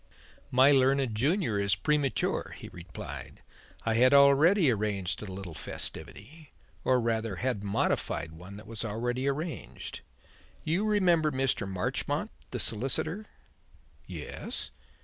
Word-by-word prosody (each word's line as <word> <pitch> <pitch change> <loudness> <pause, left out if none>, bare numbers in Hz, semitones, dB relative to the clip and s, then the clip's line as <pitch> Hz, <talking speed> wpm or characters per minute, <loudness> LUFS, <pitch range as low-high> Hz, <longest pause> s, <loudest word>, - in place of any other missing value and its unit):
"My 130 +3 +6
learned 135 -2 +3
junior 135 - +1
is 100 0 +3
premature," 150 -3 0
he - - -9
replied. 90 0 -8 0.4
"I 115 - +2
had 125 +4 +5
already 140 +4 +6
arranged 100 -4 -1
a 105 -3 -6
little 95 -3 -7
festivity 140 - -6 0.3
or 130 -1 +3
rather 115 -3 -1
had 115 0 -2
modified 100 -4 0
one 90 +5 -11
that 105 - -11
was 110 +1 -5
already 120 +4 -2
arranged. 155 +4 -4 0.6
You 175 +7 +1
remember 180 -7 +3
Mr. 130 -7 0
Marchmont, 95 -1 -1 0.2
the - - -4
solicitor?" 155 - -1 0.8
"Yes." - - -5
125 Hz, 120 wpm, -29 LUFS, 105-145 Hz, 0.8 s, My